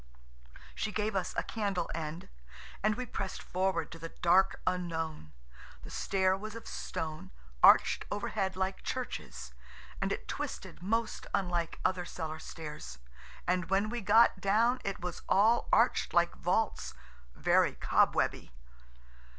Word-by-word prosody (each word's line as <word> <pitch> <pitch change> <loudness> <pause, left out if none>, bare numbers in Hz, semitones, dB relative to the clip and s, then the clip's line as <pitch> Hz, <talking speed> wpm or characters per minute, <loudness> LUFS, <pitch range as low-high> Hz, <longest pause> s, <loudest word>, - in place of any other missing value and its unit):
She 215 - -2
gave 210 +1 -1
us 185 -2 -1
a - - +1
candle 200 -6 -2
end, 160 +1 -5 0.5
and 215 +1 +2
we 250 +1 -4
pressed 195 -5 -5
forward 185 -3 -1
to 165 - -9
the 165 +1 -6
dark 185 +4 +3
unknown. 165 - -2 0.5
The - - -10
stair 190 -1 +1
was 215 +3 -7
of 230 - -8
stone, 155 -1 -5 0.3
arched - - +6
overhead 195 -2 -2
like 190 +1 -2
churches–and 65 0 -6
it - - -3
twisted - - -5
most 225 +4 -1
unlike 175 -3 -1
other 185 -1 +1
cellar 160 -3 -5
stairs 150 - -8 0.5
And 180 +1 0
when 195 +2 +2
we 240 -1 -3
got 210 0 +5
down 230 +6 +3
it 195 -2 -3
was 180 -1 -4
all 220 +4 +4
arched 235 +2 +3
like 170 0 +4
vaults, 195 +5 -1 0.4
very - - +3
cobwebby. - - +2
185 Hz, 135 wpm, -32 LUFS, 165-210 Hz, 0.5 s, arched